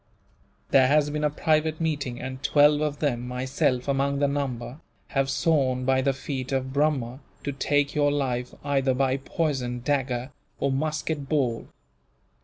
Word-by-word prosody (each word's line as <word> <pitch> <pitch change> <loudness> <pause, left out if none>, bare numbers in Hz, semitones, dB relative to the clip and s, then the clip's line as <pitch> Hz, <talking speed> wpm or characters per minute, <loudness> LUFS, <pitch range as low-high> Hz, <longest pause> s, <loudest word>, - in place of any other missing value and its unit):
There 130 -1 +6
has 145 +1 +3
been 150 0 -2
a 150 - +3
private 155 +1 +1
meeting, 145 -7 -2
and 130 0 -6
twelve 145 +1 +4
of 150 -1 -1
them, 125 -5 -1
myself 125 0 -1
among 140 0 +1
the 140 0 +2
number, 135 -2 -3 0.3
have 135 -1 0
sworn 135 -3 +1
by 130 0 +3
the 135 - +2
feet 135 -1 -5
of 130 -1 -1
Brahma 140 -4 0 0.2
to 140 - -2
take 145 +1 +1
your 145 -1 +2
life, 125 -4 -1
either 135 -2 +1
by 135 0 +1
poison, 135 -4 -2
dagger, 130 -1 -1 0.3
or 140 - +1
musket 150 0 -2
ball." 125 -7 0
140 Hz, 155 wpm, -26 LUFS, 130-145 Hz, 0.3 s, There